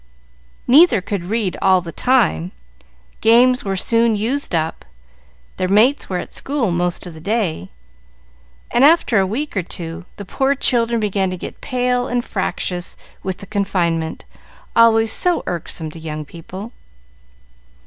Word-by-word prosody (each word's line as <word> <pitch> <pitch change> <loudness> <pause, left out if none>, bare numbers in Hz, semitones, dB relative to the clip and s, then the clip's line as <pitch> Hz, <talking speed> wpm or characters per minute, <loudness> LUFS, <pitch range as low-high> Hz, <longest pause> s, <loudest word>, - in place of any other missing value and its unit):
Neither 275 - +6
could 185 -1 -4
read 210 -1 -1
all 190 -1 +5
the 170 -2 -7
time, 90 - +1 0.7
games 250 +3 +5
were 195 -1 -2
soon 230 +3 +2
used 235 +1 -1
up, 160 0 -2 0.7
their 185 - 0
mates 220 +9 +3
were 185 - -1
at - - -6
school 270 -8 -1
most 175 +1 -1
of 175 - -8
the 160 - -11
day, 180 - -1 1.0
and 240 - +3
after 290 -8 +5
a 190 - +2
week 270 +9 -3
or 190 - +1
two 170 0 -7
the 200 - -8
poor 270 +8 0
children 235 -3 +1
began 200 -3 0
to 185 - -4
get - - -8
pale 250 -1 0
and 245 0 -1
fractious 180 -2 -3 0.2
with 190 -2 -4
the 200 - -10
confinement, 175 -6 -1 0.5
always 225 -1 +5
so 360 -2 +1
irksome 165 -2 -4
to 165 - -10
young 155 -1 -6
people. 185 +8 -9
200 Hz, 150 wpm, -19 LUFS, 175-240 Hz, 1.0 s, Neither